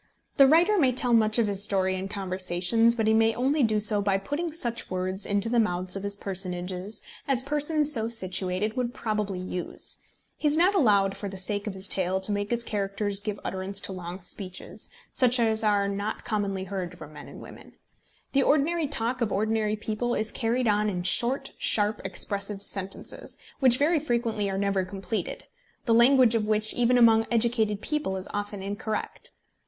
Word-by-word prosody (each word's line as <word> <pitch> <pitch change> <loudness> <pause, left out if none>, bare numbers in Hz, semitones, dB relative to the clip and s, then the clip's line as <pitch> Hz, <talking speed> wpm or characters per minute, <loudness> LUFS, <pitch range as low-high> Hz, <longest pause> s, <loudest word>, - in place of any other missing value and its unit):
The 275 - +8
writer 345 +8 +4
may 260 -5 +3
tell 245 -1 +2
much 220 -1 +4
of 230 - +3
his 200 -1 +2
story 190 -2 +1
in 190 +1 -4
conversations, 190 +3 +1
but 225 -2 0
he 220 - +3
may 225 0 +3
only 275 +5 +1
do 220 -3 +2
so 210 0 +4
by 200 -1 +1
putting 290 - -3
such 235 -7 -2
words 185 +1 -2
into 205 +2 0
the 235 +1 +2
mouths 180 -3 0
of 195 - -3
his 200 0 -2
personages 185 0 -4 0.2
as 260 -2 +1
persons 295 +1 +1
so 225 -2 +1
situated 190 -1 -2
would 245 -2 -2
probably 210 -4 -2
use. 180 -1 -5 0.4
He 305 - 0
is 295 +1 +2
not 360 +4 +4
allowed 200 - +3
for 200 - -5
the 195 - -7
sake 205 +3 -1
of 200 - -4
his 190 +1 0
tale 190 0 +1
to 190 - -2
make 205 0 -2
his 235 0 0
characters 200 -1 -1
give 205 0 -4
utterance 190 +1 -2
to - - -5
long 180 0 -7
speeches, 185 +1 -7 0.2
such 250 -1 +3
as 220 -1 +2
are 205 -2 +2
not 200 +2 -4
customarily 200 -4 -2
heard 185 -2 -5
from 155 - -11
men - - -10
and - - -11
women. - - -13 0.6
The 275 - +3
ordinary 305 +3 +2
talk 250 -2 -2
of 220 -3 0
ordinary 215 +1 0
people 220 +3 -2
is 215 0 -2
carried 240 +1 0
on 210 0 +2
in 180 -3 -3
short 240 +8 +2
sharp 210 0 +1
expressive 200 0 -2
sentences, 195 -1 -5 0.2
which 255 -2 +5
very 310 +4 +3
frequently 235 -7 -1
are 195 - -2
never 200 -1 0
completed, 195 +1 -4 0.4
the 230 - +3
language 245 0 +6
of 220 -2 0
which 215 0 +2
even 245 +1 +3
among 225 -2 +5
educated 225 -3 +2
people 300 -11 -2
is 185 - -6
often 205 -1 -4
incorrect. 205 +2 -4
210 Hz, 190 wpm, -27 LUFS, 195-235 Hz, 0.6 s, The